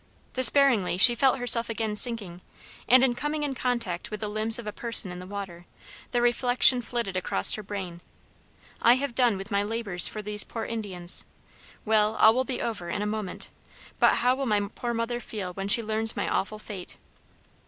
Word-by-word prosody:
Despairingly 255 -8 +5
she 240 +6 +8
felt 265 +2 +1
herself 240 -2 +2
again 220 -2 -3
sinking, 210 -6 +2 0.5
and, 255 0 +4
coming 295 +4 -4
in 285 -2 -3
contact 235 -9 -4
with 215 - -7
the 210 - -4
limbs 215 +2 +3
of 235 - -9
a 210 - -5
person 230 -4 +2
in 180 - -9
the 180 - -10
water, 190 -3 -9 0.4
the 240 -1 -1
reflection 245 +1 +2
flitted 235 -5 -5
across 135 - +1
her 215 - -5
brain, 190 -4 -8 0.8
"I 235 - +5
have 275 -1 -4
done 240 -5 +1
with 195 +3 -10
my 200 0 +1
labors 205 -4 0
for 215 - -7
these 210 0 +1
poor 225 - -7
Indians. 190 -6 +1 0.6
Well, 215 0 +1
all 220 0 +5
will 260 +2 -1
be 260 -2 -5
over 200 -7 -5
in 205 - -3
a - - -3
moment; 210 -2 -6 0.5
but - - +4
how 250 +1 +1
will 270 0 -4
my 205 -2 -1
poor 240 -1 -5
mother 230 +1 -3
feel 200 -6 -7
when 195 +1 -6
she 230 +3 +4
learns 220 +1 -1
my - - -2
awful 215 +2 -3
fate?" 200 -4 -10
220 Hz, 190 wpm, -25 LUFS, 200-240 Hz, 0.8 s, she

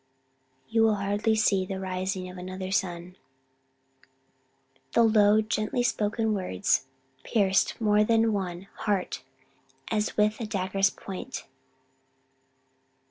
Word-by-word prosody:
"You 225 0 +2
will 220 -1 +4
hardly 205 +2 0
see 200 -3 +3
the 190 0 -5
rising 185 0 -3
of 180 0 -9
another 185 +1 -6
sun." 180 -2 -2 1.8
The 235 - +5
low, 215 -1 +5
gently 215 +2 -1
spoken 220 -1 0
words 130 - 0 0.4
pierced 195 -4 +1
more 210 -1 +4
than 225 0 +3
one 185 -2 -4
heart 200 -4 -1 0.7
as 215 -1 -1
with 210 +2 +2
a 225 - -3
dagger's 195 -1 +1
point. 195 +8 -7
205 Hz, 110 wpm, -27 LUFS, 185-215 Hz, 1.8 s, The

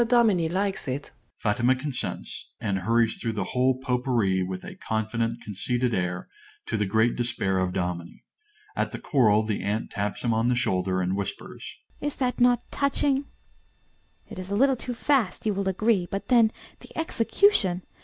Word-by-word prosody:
Dominie 220 -9 +4
likes 190 0 0
it. 135 +2 -4 0.3
(_Fatima 120 +5 +3
consents, 140 -1 -4
and 100 -3 -1
hurries 115 +4 +2
through 115 -2 -1
the 105 -3 -1
whole 130 0 +3
Potpourri 125 -7 +1
with 90 0 -4
a - - -7
confident, 115 +2 -2
conceited 120 +4 -1
air, 90 -1 -2 0.4
to - - -2
the 105 -2 0
great 110 +4 +2
despair 115 -6 0
of 90 -1 0
Dominie. 90 -1 -4 0.5
At - - 0
the - - -6
choral, 110 -9 +3
the 110 -1 -2
aunt 105 +3 -2
taps 105 -1 -3
him 120 -2 +2
on 115 +1 +2
the 125 - +3
shoulder, 95 -5 0
and 90 +1 0
whispers._) 100 -1 -5 0.4
AUNT. 290 0 -1
Is - - -23
not 255 -2 +2
that 245 -1 +3
touching? 280 0 +1 1.0
It - - -8
is 185 0 -6
a 200 - -1
little 270 +4 +4
too 245 0 -5
fast, 245 -7 +1
you 215 - +2
will 195 0 -1
agree; 190 -1 +2
but 195 - -4
then 230 -3 +5 0.3
the - - -14
execution! 230 - +2
125 Hz, 175 wpm, -26 LUFS, -, 1.0 s, then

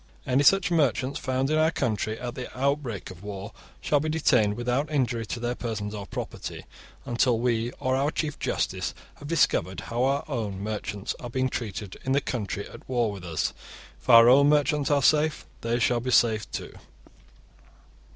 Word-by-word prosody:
Any 130 0 +2
such 185 +4 +4
merchants 140 -3 +1
found 130 +1 -1
in 155 - +3
our 160 0 +4
country 110 -7 -2
at 120 -1 -4
the 125 -1 -6
outbreak 135 -9 -1
of 90 -1 -12
war 100 +1 -7 0.3
shall 145 - +2
be 155 +2 -2
detained 125 -10 +3
without 125 +5 -1
injury 120 -6 0
to 120 - -4
their 120 +1 -1
persons 110 -4 -4
or 100 -2 -6
property, - - -6 0.4
until 120 0 +2
we 115 -1 0
or 130 -2 +1
our 140 +2 +1
chief 150 -1 -3
justice - - -2 0.2
have 145 - -9
discovered 95 - +1
how 120 +2 -3
our 140 +2 +1
own 110 -9 -3
merchants 105 -1 -4
are 120 - -7
being 130 +2 0
treated 105 -5 -5
in 130 - 0
the 140 - +4
country 105 -6 -4
at - - -14
war 120 -4 +1
with 100 -3 -8
us. 80 -3 -2 0.5
If - - -13
our 115 0 +9
own 140 +3 +7
merchants 150 -1 +2
are 145 -2 +3
safe 150 +1 +3 0.2
they 115 +1 0
shall 120 0 +2
be 125 +2 -4
safe 110 -4 +3
too. - - -6
125 Hz, 180 wpm, -26 LUFS, 110-140 Hz, 0.5 s, our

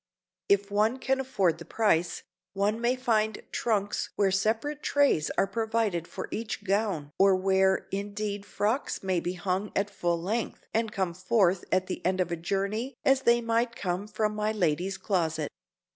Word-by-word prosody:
If 200 0 +3
one 215 +5 +2
can 265 0 0
afford 195 -11 +1
the - - -7
price, 175 -6 +1 0.3
one 205 +3 0
may 240 +2 +2
find 220 -4 0
trunks 205 -3 0
where 195 -2 +2
separate 225 +10 0
trays 280 - +2
are - - +4
provided 220 -4 -1
for - - -6
each 215 -2 -4
gown 195 -7 0
or 195 0 +6
where 190 0 +2
indeed 205 +1 -3
frocks 210 +5 -1
may 185 -2 +1
be 175 +2 -3
hung 185 +3 -2
at 200 +1 0
full 175 -3 0
length 215 +7 -3
and 225 -1 0
come 190 -4 -1
forth 185 0 +2
at 185 0 +2
the 185 - -5
end 185 +1 +1
of 180 -1 0
a - - +1
journey 200 +9 -2
as 270 0 +4
they 235 -1 +4
might 230 +1 0
come 185 0 -2
from 215 0 -1
my 210 0 0
lady's 185 -1 0
closet. 160 -6 -1
200 Hz, 170 wpm, -28 LUFS, 185-225 Hz, 0.3 s, or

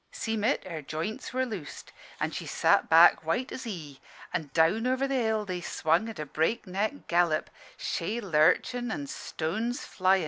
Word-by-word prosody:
"Seem' 220 -2 -2
it, 245 +6 +2
her 165 -4 -6
joints 155 +9 -4
were 260 0 0
loosed, 200 - -7 0.3
an' - - -1
she - - -5
sat - - +3
back 165 0 +7
white 235 +11 -1
as 260 - -6
he; 155 - -7 0.3
an' 150 - -2
down 170 - +3
over 260 +2 +1
the 275 - -2
hill 220 -4 +1
they 180 -2 -4
swung 170 +6 +1
at 225 - -8
a 150 - -4
breakneck 200 - -1
gallop, 170 -2 +2 0.3
shay 210 +8 -2
lurchin' 205 +7 +2
and 145 -8 -4
stones 220 - -3
flyin'. 190 +1 +2
190 Hz, 170 wpm, -28 LUFS, 160-230 Hz, 0.3 s, back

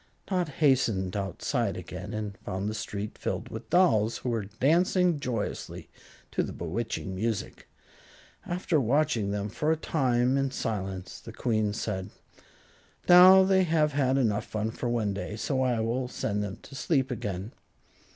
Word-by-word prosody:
Dot 180 -3 0
hastened 125 - +1
outside 100 -3 -1
again 95 +3 -7
and 105 -3 -4
found 95 +1 -4
the 105 - -2
street 105 -1 -5
filled - - -3
with 110 +1 -8
dolls, 115 - +3
who 125 - -4
were 115 -4 -1
dancing 165 - +2
joyously 120 -6 -4 0.4
to - - 0
the - - -3
bewitching 95 +2 -4
music. 105 +1 -3 0.8
After 175 -3 0
watching 120 -4 +1
them 100 0 -2
for 150 +9 -1
a 160 - +2
time 130 -4 +1
in 135 0 +1
silence 95 -7 -4
the - - -10
Queen 110 -3 0
said: 100 -3 -3 1.0
"Now 185 +2 +9
they 190 0 +4
have 160 -4 +2
had 135 -2 +1
enough 110 -6 +1
fun 110 +1 -2
for 120 +1 -3
one 110 -4 0
day, 105 +1 -5
so 130 +4 -1
I 125 -3 +1
will 120 +3 -1
send 105 -4 -2
them 100 -2 -5
to - - -13
sleep 135 -1 0
again." 100 -1 -4
115 Hz, 155 wpm, -28 LUFS, 105-140 Hz, 1.0 s, Now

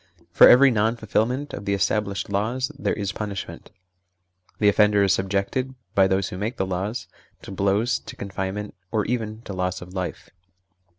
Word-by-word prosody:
For - - +8
every 135 +2 +7
non 110 +1 +1
fulfilment 120 +5 -1
of 100 - -6
the 100 - +1
established 100 0 -1
laws 115 +6 -1
there - - 0
is 100 -2 -2
punishment: 100 -2 -6 0.9
the 105 - +2
offender 105 0 +4
is 95 -1 +3
sub 95 0 -1
jected, 125 +7 -1 0.2
by 95 -1 +5
those 95 0 0
who 90 - -7
make 110 +4 -3
the 95 - 0
laws, 95 +6 -3 0.4
to - - -9
blows, 100 +5 +1
to - - -10
confinement, 100 +1 -4 0.2
or 105 -2 0
even 110 -2 -3
to 100 - -7
loss 90 0 -2
of 90 +1 -11
life. 95 0 -5
100 Hz, 175 wpm, -24 LUFS, 95-110 Hz, 0.9 s, For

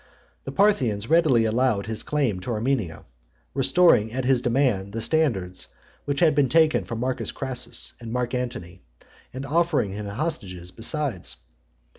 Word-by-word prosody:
The - - -4
Parthians 130 - +1
readily 155 -9 +4
allowed 110 -2 +1
his 110 -1 -2
claim 135 -11 0
to 90 - -5
Armenia; 110 -8 -2 0.5
restoring 135 -4 +4
at 130 +1 -3
his 130 -2 +3
demand, 120 -6 +1
the 115 - -3
standards 115 - 0 0.4
which 140 -1 -2
they 165 -3 +6
had 140 -3 +2
taken 160 +1 +3
from 115 -2 -5
Marcus 130 +1 -1
Crassus 125 -3 -3
and 115 -2 -8
Mark 125 0 -2
Antony, 125 -8 -4 0.5
and 130 +2 -6
offering 155 - +1
him 105 +1 -5
hostages 100 - -4
besides. 115 - -2
125 Hz, 145 wpm, -24 LUFS, 105-140 Hz, 0.5 s, they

